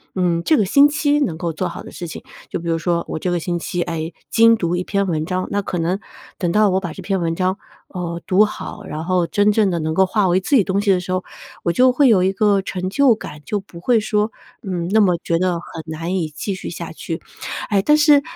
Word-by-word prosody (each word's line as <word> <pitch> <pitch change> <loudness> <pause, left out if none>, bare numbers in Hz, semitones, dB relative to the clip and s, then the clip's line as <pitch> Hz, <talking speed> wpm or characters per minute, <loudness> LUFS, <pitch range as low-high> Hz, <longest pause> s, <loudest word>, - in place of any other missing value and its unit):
嗯， 175 -3 +1
这 310 - +3
个 210 - +2
星 280 +9 +6
期 295 0 +1
能 225 - -1
够 170 -1 -3
做 180 +3 -2
好 170 - -8
的 - - -11
事 175 - -7
情。 160 - -8 0.3
就 - - -3
比 170 - -7
如 165 - +1
说， 170 0 0
我 - - -3
这 180 - -2
个 175 - 0
星 175 +1 -2
期， 175 +1 -3
哎， 165 -1 -4 0.2
精 230 0 +6
读 175 -3 -1
一 180 - -1
篇 200 +1 0
文 155 -3 -1
章， 185 +2 -2
那 205 0 0
可 185 - -4
能 175 +4 0 0.4
等 175 -3 0
到 210 +2 +4
我 190 0 +2
把 175 -4 -5
这 - - -9
篇 195 -1 0
文 165 -1 -1
章， 185 +2 0 0.3
呃， 170 -2 -5
读 195 +3 +5
好， 210 0 -7
然 155 -2 -5
后 180 -1 +2
真 205 +3 +3
正 210 -1 +3
地 170 - -1
能 160 0 -2
够 190 +3 +4
化 200 +1 +1
为 180 +1 +3
自 230 +9 +1
己 220 - +5
东 195 +1 0
西 205 - +2
的 185 - +3
时 180 +1 -6
候， 185 0 0 0.4
我 170 - +1
就 255 +7 +4
会 275 +2 +4
有 205 -5 +5
一 190 - +2
个 200 -1 +2
成 185 -1 -4
就 255 +3 +4
感， 150 -8 -9
就 210 - -1
不 185 -3 -13
会 230 +5 +3
说， 210 +1 0 0.3
嗯， 180 -4 -3
那 220 - +4
么 180 -4 +3
觉 165 - +1
得 185 0 +1
很 170 -1 -7
难 165 +3 -3
以 170 -4 -1
继 175 +7 -4
续 185 - -6
下 - - -6
去。 - - -6 0.5
哎， 200 -2 +3
但 300 +9 +4
是 295 -2 +6
185 Hz, 280 characters per minute, -20 LUFS, 170-210 Hz, 0.5 s, 星